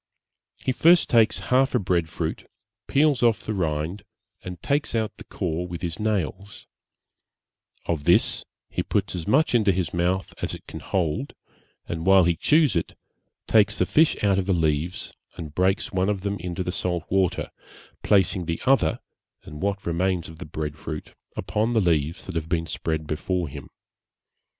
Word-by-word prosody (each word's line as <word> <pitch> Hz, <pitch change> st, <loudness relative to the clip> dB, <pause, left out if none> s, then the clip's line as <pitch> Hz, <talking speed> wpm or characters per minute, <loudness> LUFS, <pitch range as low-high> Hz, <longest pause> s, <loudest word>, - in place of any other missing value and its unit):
He -, -, -1 dB
first 170 Hz, +6 st, +5 dB
takes 115 Hz, -2 st, +4 dB, 0.2 s
half 130 Hz, +1 st, +4 dB
a -, -, +4 dB
bread 90 Hz, -4 st, 0 dB
fruit, -, -, -4 dB, 0.4 s
peels 145 Hz, -1 st, +3 dB
off 115 Hz, -3 st, +3 dB
the 110 Hz, -, -3 dB
rind, 80 Hz, +1 st, -2 dB, 0.4 s
and 90 Hz, -1 st, -7 dB
takes 140 Hz, -3 st, 0 dB
out 110 Hz, -2 st, -1 dB
the -, -, -10 dB
core 90 Hz, -2 st, -3 dB
with 85 Hz, 0 st, -7 dB
his 85 Hz, -2 st, -3 dB
nails; 100 Hz, -2 st, -2 dB, 1.2 s
of 80 Hz, -4 st, -2 dB
this -, -, +3 dB, 0.3 s
he -, -, -1 dB
puts 100 Hz, -1 st, -1 dB
as 85 Hz, -3 st, -5 dB
much 140 Hz, +8 st, +3 dB
into 110 Hz, -4 st, +4 dB
his 90 Hz, -4 st, -2 dB
mouth 90 Hz, +2 st, 0 dB
as -, -, -2 dB
it -, -, -14 dB
can -, -, -8 dB
hold, 95 Hz, -, -2 dB, 0.5 s
and 80 Hz, -1 st, -4 dB
while 95 Hz, -1 st, +7 dB
he 85 Hz, 0 st, +2 dB
chews 150 Hz, -, +3 dB
it, 85 Hz, -, -2 dB, 0.5 s
takes 110 Hz, -2 st, +3 dB
the 90 Hz, -, +2 dB
fish 155 Hz, -, +4 dB
out 100 Hz, -2 st, +3 dB
of 95 Hz, -, -2 dB
the 95 Hz, -, +3 dB
leaves 80 Hz, +1 st, -1 dB, 0.2 s
and 75 Hz, -3 st, -7 dB
breaks 95 Hz, +3 st, +1 dB
one 95 Hz, +1 st, +1 dB
of 100 Hz, -2 st, -1 dB
them 100 Hz, 0 st, -2 dB
into 90 Hz, +1 st, -3 dB
the 90 Hz, -, -2 dB
salt 90 Hz, -2 st, -2 dB
water, 95 Hz, -1 st, +1 dB, 0.5 s
placing 95 Hz, -3 st, +2 dB
the 85 Hz, 0 st, -2 dB
other, 125 Hz, -12 st, +3 dB, 0.4 s
and 75 Hz, 0 st, -10 dB
what 100 Hz, +1 st, -1 dB
remains 90 Hz, +1 st, 0 dB
of 80 Hz, 0 st, -12 dB
the 90 Hz, -, -6 dB
bread 75 Hz, 0 st, -5 dB
fruit, 75 Hz, 0 st, -6 dB, 0.2 s
upon 110 Hz, +3 st, 0 dB
the 115 Hz, -, +4 dB
leaves 85 Hz, -3 st, 0 dB
that 95 Hz, -, -6 dB
have 80 Hz, -1 st, -3 dB
been 85 Hz, -2 st, 0 dB
spread 80 Hz, -1 st, -3 dB
before 85 Hz, +3 st, -2 dB
him. 70 Hz, -, -9 dB
90 Hz, 175 wpm, -25 LUFS, 85-105 Hz, 1.2 s, while